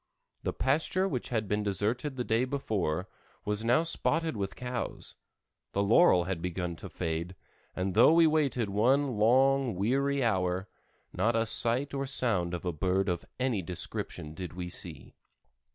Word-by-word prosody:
The - - -1
pasture 160 +7 +1
which 125 -10 -3
had 110 -4 -1
been 105 +1 0
deserted 110 +8 -1
the 125 - -2
day 115 +1 +1
before, 100 - -2 0.4
was 105 +1 -1
now 120 +7 +3
spotted 165 -2 +1
with 100 -3 -3
cows, 125 0 -5 0.6
the 100 - +1
laurel 100 - +5
had 90 -2 -3
begun 90 -1 -3
to - - -9
fade, 85 +2 -3 0.4
and 95 +1 -2
though 115 +9 +6
we 165 0 +6
waited 140 -9 +1
one 125 +3 +2
long, 130 +1 +3
weary 135 +8 +1
hour, 95 -3 0 0.5
not 115 +1 +1
a 115 0 +2
sight 120 +5 0
or 135 0 -2
sound 100 -10 +1
of 90 - -7
a 90 - -1
bird 95 +5 0
of 85 -1 -2 0.2
any 125 -6 0
description 80 -3 -5
did 90 0 -7
we 90 0 -5
see. - - -7
110 Hz, 160 wpm, -30 LUFS, 90-135 Hz, 0.6 s, though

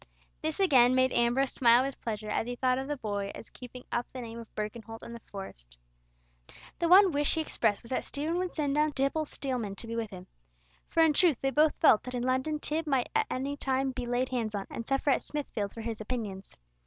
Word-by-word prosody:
This 315 +2 -2
again 255 -9 +5
made 260 0 +3
Ambrose 240 +3 +2
smile 240 0 +5
with 275 0 -5
pleasure 215 -2 -4
as 225 - -1
he 245 - -3
thought 255 0 +1
of 265 - -4
the 295 0 -2
boy 205 -4 -3
as - - -11
keeping 250 0 -10
up 240 0 -2
the 255 - -6
name 230 -1 -7
of 230 - -12
Birkenholt 225 +1 -6
in 235 - -8
the 235 - -8
Forest. - - -10 1.0
The 340 - +1
one 380 +1 +8
wish 290 -1 +2
he 320 - +1
expressed 220 -8 0
was 230 - -12
that 255 - 0
Stephen 315 +5 -2
would 365 -1 -2
send 290 -3 -1
down 300 +1 +2
Tibble 275 +3 0
Steelman 250 -9 -3
to 230 - -7
be 230 0 -5
with 230 -2 -2
him. 185 -3 -10 0.6
For 330 - +3
in 315 -2 +4
truth 320 -3 +4
they 270 - 0
both 305 +2 +3
felt 225 -9 +6
that 250 0 -6
in 245 - -2
London 260 +4 0
Tib 315 +2 -3
might 270 -4 +1
at 445 -1 +2
any 275 +2 -2
time 270 -1 0
be 250 -2 -5
laid 245 +1 0
hands 230 -4 -2
on, 195 -1 -3
and 230 - -6
suffer 270 +1 +1
at - - +2
Smithfield 230 -9 -3
for 230 - -8
his 225 -1 -4
opinions. 210 -4 -5
255 Hz, 230 wpm, -30 LUFS, 225-290 Hz, 1.0 s, one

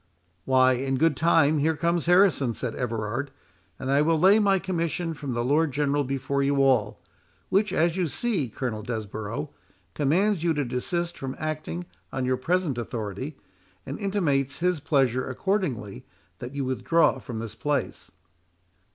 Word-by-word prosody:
"Why, 130 -1 +5
in 135 +1 -1
good 160 +1 +3
time 155 0 +3
here 160 +2 +2
comes 170 +1 0
Harrison," 175 - +4
said - - -3
Everard, 120 +2 -3 0.5
"and 130 0 -3
I 140 +1 +4
will 160 +1 +3
lay 195 +6 +6
my 200 -2 +3
commission 170 -2 -2
from 140 -5 -5
the 120 - 0
Lord 145 +4 +2
General 145 +1 +1
before 135 +1 -1
you 140 +1 +2
all; 120 -6 +2 0.5
which, 205 +1 +2
as 170 -1 +1
you 180 -3 +1
see, 180 - -1
Colonel 110 -1 -4
Desborough, 110 +4 -5 0.4
commands 175 +6 +2
you 165 -2 +2
to 145 -1 0
desist 170 +8 -2
from 135 0 -4
acting 155 - -4 0.3
on 130 -1 -2
your 130 0 +1
present 165 -2 0
authority, 115 +5 -5 0.5
and 135 - -6
intimates 145 -9 0
his 180 -1 +1
pleasure 130 -4 +1
accordingly, 130 - -2 0.4
that 125 +3 -7
you 140 -2 -1
withdraw 145 +6 +2
from 120 - -7
this 110 -1 -5
place." 145 +5 -2
140 Hz, 155 wpm, -26 LUFS, 125-165 Hz, 0.5 s, lay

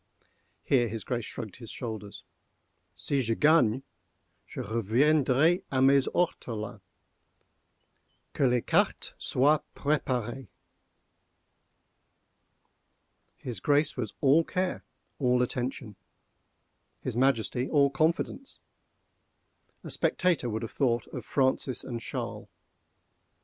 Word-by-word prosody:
_ - - -36 0.4
(Here 125 -4 +3
his 110 0 -5
Grace 120 -3 -3
shrugged 110 -6 -7
his 115 -3 -10
shoulders.) 110 -4 -7 0.7
Si 140 -2 -1
je 115 -2 0
gagne, 135 -5 +4 0.6
je - - -8
reviendrai 135 - +2
a 130 - 0
mes 135 +1 +5
ortolans—que 110 - -2 1.7
les 125 -1 +2
cartes - - +1
soient 145 +4 +3
préparées!" 130 -4 -1 2.9
His 120 -6 -5
Grace 145 +7 +2
was 115 -5 -4
all 145 +4 +5
care, 185 +2 -2 0.4
all 125 -2 +3
attention—his 125 -4 -8
Majesty 125 -1 +1
all 140 -2 +4
confidence. 165 - -1 1.3
A - - -6
spectator 175 -9 +1
would 110 +1 -3
have 115 - -5
thought 120 -4 0
of - - -6
Francis 130 -1 0
and 120 -2 -5
Charles. - - -5
130 Hz, 95 wpm, -28 LUFS, 115-145 Hz, 2.9 s, mes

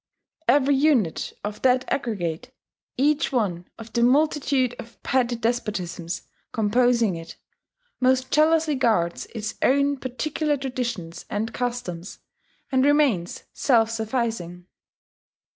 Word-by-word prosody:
Every 280 +2 +4
unit 270 - +2
of 210 +1 -5
that 255 0 +3
aggregate, 195 - -3 0.5
each 290 +3 +2
one 190 -9 -1
of 225 0 -11
the 235 - +1
multitude 270 -1 +2
of 230 -1 -10
petty 250 -2 +1
despotisms 210 -8 -3 0.3
composing 230 -1 +2
it, 165 0 -9 0.6
most 260 0 +2
jealously 315 0 +3
guards 220 -10 +1
its 215 -1 -3
own 280 +1 +3
particular 295 +4 -2
traditions 235 -11 -4
and 220 +3 -2
customs, 235 -8 -4 0.5
and 260 -1 +3
remains 280 - +2
self 225 -4 +3
sufficing. 220 -6 -3
240 Hz, 110 wpm, -24 LUFS, 210-265 Hz, 0.6 s, Every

